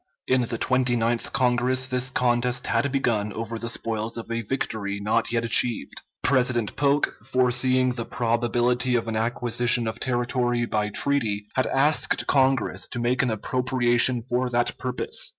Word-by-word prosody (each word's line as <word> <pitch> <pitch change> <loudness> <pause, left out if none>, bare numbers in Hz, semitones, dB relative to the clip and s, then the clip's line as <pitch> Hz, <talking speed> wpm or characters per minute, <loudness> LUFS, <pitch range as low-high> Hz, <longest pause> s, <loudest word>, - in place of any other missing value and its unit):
In 130 0 +2
the 115 -1 -3
Twenty 125 0 +1
ninth 115 0 -1
Congress 125 0 +1
this 130 0 0
contest 125 -1 0
had 115 +4 0
begun 115 -6 0
over 115 0 -5
the 115 - -4
spoils 115 0 -3
of 115 0 -7
a 115 0 -1
victory 105 -4 -3
not 110 +3 0
yet 115 -1 0
achieved. 115 - 0 0.2
President 125 -4 +2
Polk, 145 0 +1
foreseeing 130 0 +2
the 115 -2 -5
probability 120 +1 0
of 115 -1 -1
an 115 - -3
acquisition 120 +1 +1
of 110 +1 -5
territory 120 -1 -1
by 105 -2 -1
treaty, 110 -4 0
had 130 - 0
asked 145 +3 +1
Congress 135 -2 +1
to - - -6
make 125 +2 +1
an 125 - 0
appropriation 120 +1 +1
for 125 0 0
that 120 0 0
purpose. 125 0 0
120 Hz, 155 wpm, -24 LUFS, 115-130 Hz, 0.2 s, In